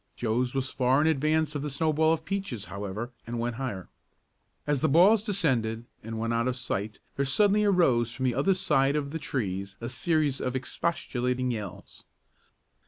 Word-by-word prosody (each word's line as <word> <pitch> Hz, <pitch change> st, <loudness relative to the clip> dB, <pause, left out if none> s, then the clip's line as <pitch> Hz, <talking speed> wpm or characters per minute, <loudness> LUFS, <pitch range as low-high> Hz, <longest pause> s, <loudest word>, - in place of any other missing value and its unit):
Joe's 125 Hz, +2 st, -1 dB
was 130 Hz, -1 st, -1 dB
far 130 Hz, +1 st, +2 dB
in -, -, +2 dB
advance 155 Hz, +1 st, +2 dB
of 145 Hz, -, -3 dB
the 150 Hz, -, -3 dB
snowball 155 Hz, +2 st, +2 dB
of 160 Hz, 0 st, -1 dB
Peaches, 190 Hz, -, -3 dB
however, 100 Hz, +4 st, -5 dB, 0.2 s
and 120 Hz, 0 st, -3 dB
went 120 Hz, 0 st, -2 dB
higher. 105 Hz, -10 st, -4 dB, 0.8 s
As 145 Hz, -2 st, 0 dB
the 155 Hz, -, +3 dB
balls 190 Hz, +9 st, +6 dB
descended 130 Hz, -, 0 dB, 0.2 s
and 115 Hz, +1 st, -6 dB
went 115 Hz, +1 st, -1 dB
out 115 Hz, +1 st, +1 dB
of 130 Hz, -, 0 dB
sight, 105 Hz, -4 st, -3 dB, 0.2 s
there 140 Hz, -, +2 dB
suddenly 205 Hz, +10 st, +3 dB
arose 130 Hz, -, +3 dB
from 130 Hz, +1 st, -3 dB
the 125 Hz, -, +2 dB
other 145 Hz, +10 st, +2 dB
side 150 Hz, -7 st, +2 dB
of 140 Hz, -2 st, -2 dB
the 160 Hz, -, -3 dB
trees 100 Hz, -8 st, -3 dB
a 115 Hz, -, -4 dB
series 145 Hz, +2 st, 0 dB
of 125 Hz, 0 st, -2 dB
expostulating 130 Hz, -3 st, -1 dB
yells. 100 Hz, -4 st, -7 dB
130 Hz, 175 wpm, -28 LUFS, 115-155 Hz, 0.8 s, balls